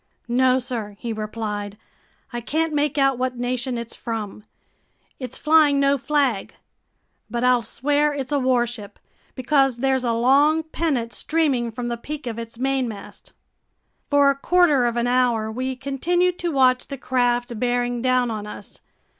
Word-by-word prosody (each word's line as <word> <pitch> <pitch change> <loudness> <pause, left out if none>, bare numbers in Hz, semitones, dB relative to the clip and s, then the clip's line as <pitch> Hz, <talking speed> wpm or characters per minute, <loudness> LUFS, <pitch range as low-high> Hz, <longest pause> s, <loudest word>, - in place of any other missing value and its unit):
"No, 255 +1 +3
sir," 235 -5 -5
he 230 +1 -4
replied. 210 -1 -5 0.6
"I 240 - -3
can't 315 +6 -1
make 295 -1 0
out 270 -2 +2
what 255 -1 -2
nation 245 0 -2
it's 235 0 -6
from. 220 -3 -5 0.8
It's 255 -2 -5
flying 300 -2 +4
no 280 0 +3
flag. 275 -8 0 0.7
But 240 0 -2
I'll 250 -1 +4
swear 290 +6 0
it's 280 -1 -5
a 290 - +2
warship, 240 -5 -1 0.4
because 270 -1 +2
there's 265 0 +1
a 240 - +1
long 280 +7 +3
pennant 295 -7 -2
streaming 285 -7 0
from 240 +2 -5
the 235 0 -3
peak 295 +4 -7
of 230 -2 -4
its 230 0 -8
mainmast." 255 -5 -3 0.8
For 285 -1 +5
a - - -3
quarter 295 -4 +3
of 240 0 -2
an 235 - +1
hour, 245 -3 +1
we 255 +3 -3
continued 350 +7 0
to 345 -1 -1
watch 255 -3 +3
the 275 - -6
craft 245 -2 0
bearing 245 0 0
down 255 -1 +2
on 210 -1 -5
us. - - -10
255 Hz, 155 wpm, -22 LUFS, 235-280 Hz, 0.8 s, For